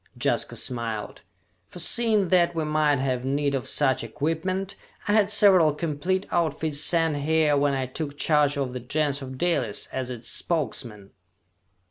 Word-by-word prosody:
Jaska - - 0
smiled. 115 -4 -3 0.5
"Forseeing 210 - +2
that 175 -2 +2
we 160 - -1
might 150 -1 +1
have 130 -1 -2
need 140 +1 -1
of 135 -3 -3
such 135 -5 +1
equipment, 165 - -3 0.3
I - - +1
had 210 -2 +3
several 185 -8 +5
complete 170 +4 -2
outfits 160 -3 -1
sent 165 -2 +1
here 155 0 +2
when 140 0 +1
I 130 -1 -2
took 145 +2 -6
charge 150 -1 +2
of 135 -3 -3
the 125 - -4
Gens 140 +3 -1
of 130 -1 -8
Dalis 130 -10 0
as 130 -1 -4
its 120 -2 -7
Spokesman!" 115 - -2
150 Hz, 150 wpm, -25 LUFS, 130-170 Hz, 0.5 s, several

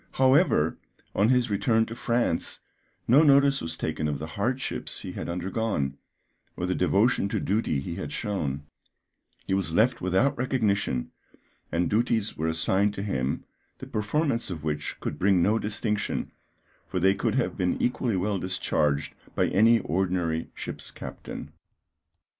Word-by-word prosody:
However, 130 - +4 0.4
on 105 +3 +3
his 125 -3 +3
return 110 +3 +2
to 115 - -7
France, 120 -6 -1 0.5
no 135 +6 +7
notice 140 -2 +5
was 80 0 -4
taken 75 -1 -2
of 75 -1 -1
the 75 - -5
hardships 125 +6 -2
he - - -6
had - - -5
undergone, 90 -5 -1 0.6
or 90 - -1
the 90 - 0
devotion 100 +4 +2
to - - -1
duty 100 -7 0
he 85 +5 -5
had - - -5
shown; 95 - -2 0.8
he - - -1
was 95 -4 0
left 120 +5 +3
without 95 +10 +2
recognition, 105 - 0 0.6
and 85 +1 +1
duties 110 -1 +1
were 80 - -1
assigned 95 +6 +1
to 100 - -4
him, 65 -9 -1 0.3
the - - -8
performance 115 +4 -1
of 80 -5 -5
which 75 -1 -3
could - - -4
bring 95 -2 +4
no 110 +4 +3
distinction, 105 0 -2 0.6
for 95 - -2
they 95 +2 +4
could 110 +3 -1
have 130 - 0
been 90 -2 0
equally 120 -4 0
well 100 +1 0
discharged 75 -6 0 0.2
by - - +2
any 115 +4 +5
ordinary 85 -1 -1
ship's - - -6
captain. - - -8
100 Hz, 150 wpm, -27 LUFS, 85-115 Hz, 0.8 s, no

